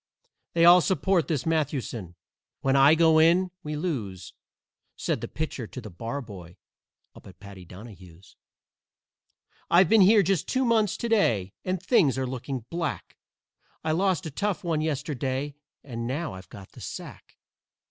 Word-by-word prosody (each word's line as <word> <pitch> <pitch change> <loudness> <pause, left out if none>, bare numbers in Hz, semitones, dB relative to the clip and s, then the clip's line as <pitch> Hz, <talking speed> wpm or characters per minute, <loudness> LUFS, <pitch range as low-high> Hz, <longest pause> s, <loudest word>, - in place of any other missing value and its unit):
They 170 0 +4
all 175 +1 +8
support 190 -1 +1
this 150 -7 -2
Mathewson. 135 - -2 0.5
When 135 0 +1
I 140 +3 +6
go 160 -1 +5
in 175 +3 +4
we 150 -3 -5
lose!" 105 - -4 0.6
Said - - -2
the - - -4
Pitcher 150 -6 -5
to 130 - -8
the 110 -4 -10
Barboy 105 -4 -7 0.6
up - - -15
at 95 - -15
Paddy 100 -3 -12
Donahue's. 90 -2 -14 1.3
"I've 175 0 +5
been 225 -2 +6
here 205 +2 +6
just 190 -3 0
two 260 0 0
months 220 -4 +2
to 235 - -3
day, 115 - +1
and 185 0 -2
things 175 - +2
are 130 - -1
looking 130 -1 -5
black; 170 -3 -4 0.7
I 155 - 0
lost 185 +2 +1
a 160 - -5
tough 205 +5 -2
one 165 -3 -1
yesterday, 145 -2 -3 0.3
and 115 -3 -5
now 150 - -3
I've 95 0 -11
got 95 -2 -12
the - - -14
sack. - - -9
145 Hz, 155 wpm, -26 LUFS, 115-175 Hz, 1.3 s, all